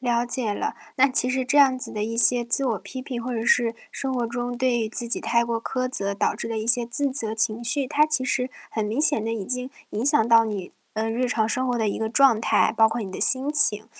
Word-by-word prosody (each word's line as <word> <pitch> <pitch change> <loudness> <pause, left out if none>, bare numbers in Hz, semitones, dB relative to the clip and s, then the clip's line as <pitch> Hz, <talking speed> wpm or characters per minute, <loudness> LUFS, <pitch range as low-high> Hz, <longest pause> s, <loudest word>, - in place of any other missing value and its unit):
了 240 -1 -1
解 240 -4 -3
了。 - - -4 0.2
那 275 +1 +4
其 255 -1 +3
实 260 0 -1
这 290 +3 0
样 265 -2 +4
子 - - -7
的 210 - -4
一 230 +1 -5
些 240 0 +6
自 240 +4 0
我 225 -5 -1
批 260 - -9
评， 255 -2 -6
或 250 +1 -5
者 225 -1 -3
是 230 -2 +2 0.2
生 270 -1 -4
活 240 -2 -2
中 245 +1 -5
对 250 -1 0
于 220 -1 -2
自 235 +1 -4
己 - - 0
太 235 0 +1
过 230 -1 -3
苛 255 -1 -3
责 200 -5 -3
导 - - -1
致 - - -6
的 225 -1 -3
一 215 - -5
些 240 0 +4
自 270 +4 -2
责 225 -5 -3
情 225 +1 0
绪， 265 +4 -1
它 295 +4 +2
其 305 -4 +1
实 255 0 -2 0.2
很 220 - -3
明 220 +7 -2
显 290 -8 +3
地 225 - -3
已 210 -4 -4
经 250 +3 -2 0.2
影 220 +4 -4
响 280 -5 +2
到 230 -1 +5
你， 205 -4 -6 0.2
呃， 220 +1 -2
日 250 +2 -1
常 220 -3 -1
生 255 +3 -1
活 245 - -1
的 220 -2 0
一 - - -4
个 220 0 -2
状 265 -3 +4
态， 230 - +1
包 220 - +5
括 240 - -4
你 195 -4 -6
的 - - -7
心 275 0 +4
情， 220 -8 +4
240 Hz, 290 characters per minute, -23 LUFS, 225-255 Hz, 0.2 s, 些